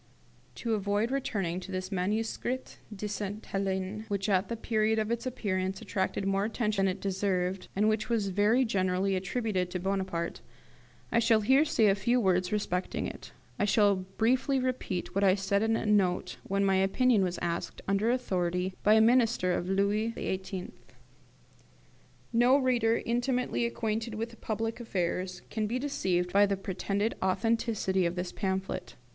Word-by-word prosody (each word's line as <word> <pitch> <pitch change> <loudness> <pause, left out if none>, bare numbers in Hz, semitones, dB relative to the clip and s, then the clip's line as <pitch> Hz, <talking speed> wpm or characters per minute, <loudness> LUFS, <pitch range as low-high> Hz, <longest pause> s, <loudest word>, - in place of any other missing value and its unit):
To 230 - -2
avoid 205 +3 0
returning 195 -10 -1
to 185 +1 -9
this 185 +1 -4
'Manuscrit 220 +6 -2
de 210 0 -5
Sainte 205 +1 -4
Helene', 195 +2 -2
which 200 -1 -2
at 190 0 +2
the 230 - -3
period 220 0 +1
of 215 +1 0
its 235 +2 -2
appearance 190 -6 -2
attracted 190 -1 -2
more 195 0 +1
attention 215 -2 0
than 185 - 0
it - - -13
deserved, 190 -1 -1
and 210 +2 +3
which 215 +1 0
was 220 -4 +1
very 210 +7 +3
generally 190 -2 +1
attributed 190 -1 -1
to 180 - -3
Bonaparte, 190 -3 -2 0.7
I 235 - +3
shall 225 -1 +4
here 265 +7 +5
say 230 -7 +2
a 200 - +5
few 235 +6 +1
words 185 -4 +1
respecting 190 -3 -1
it. - - -8 0.3
I - - +3
shall 205 0 +4
briefly 230 +9 0
repeat 255 -8 -2
what 200 - +1
I 190 -1 +5
said 200 0 0
in 225 0 +2
a - - -2
note 185 -4 +1
when 195 +1 +1
my 195 -1 +3
opinion 205 +3 +3
was 180 -1 -1
asked, 170 0 -3
under 200 +3 +2
high 245 - +4
authority, 180 -5 -1
by 210 +1 +5
a 220 - +6
minister 225 -5 +3
of 175 +1 -2
Louis 205 +4 +1
XVIII. 190 -1 -4 1.6
No 245 +3 +5
reader 240 -4 +2
intimately 245 0 0
acquainted 225 -1 -2
with 230 +1 -5
public 225 +2 -2
affairs 185 -4 -2
can 215 -1 -1
be 235 +4 -1
deceived 185 -10 -1
by 200 +1 +6
the 200 -1 0
pretended 200 +3 -2
authenticity 190 -1 +1
of 170 - -4
this 180 0 -3
pamphlet. 190 -1 -3
200 Hz, 165 wpm, -29 LUFS, 190-225 Hz, 1.6 s, a